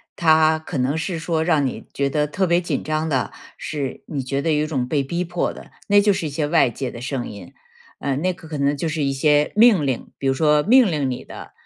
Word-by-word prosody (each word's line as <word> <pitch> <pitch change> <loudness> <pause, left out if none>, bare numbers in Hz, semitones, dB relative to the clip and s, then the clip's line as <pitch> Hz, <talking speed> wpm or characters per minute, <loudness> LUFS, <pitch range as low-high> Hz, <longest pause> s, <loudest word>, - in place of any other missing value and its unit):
它 160 -1 +4
可 160 0 -6
能 130 +3 0
是 160 +2 -3
说 160 0 -1
让 160 -4 +2
你 130 - -5
觉 140 0 -1
得 150 +2 0
特 190 +6 -1
别 175 0 +2
紧 175 - -3
张 155 +1 -1
的， 135 -4 -1 0.3
是 140 -4 -5
你 145 -4 -4
觉 135 +2 -3
得 165 - +1
有 150 0 +2
一 - - -2
种 130 -5 -2
被 140 0 0
逼 170 +6 -2
迫 175 0 -2
的， - - -13 0.2
那 205 0 +5
就 205 0 +3
是 170 - -3
一 - - -4
些 145 +2 -2
外 150 -4 +3
界 130 +2 -5
的 120 - -9
声 130 -1 -3
音。 100 -4 -11 0.5
呃， 140 -2 -1
那 180 +6 0
个 165 -2 -14
可 155 - -5
能 140 +1 +1
就 165 - -2
是 155 -1 -2
一 140 - +1
些 145 +2 +2
命 210 -9 +5
令， 130 -3 -3
比 135 - -2
如 135 - +3
说 150 +1 +3
命 235 - +5
令 145 -4 -1
你 125 -1 -5
的， - - -10
150 Hz, 275 characters per minute, -21 LUFS, 140-165 Hz, 0.5 s, 那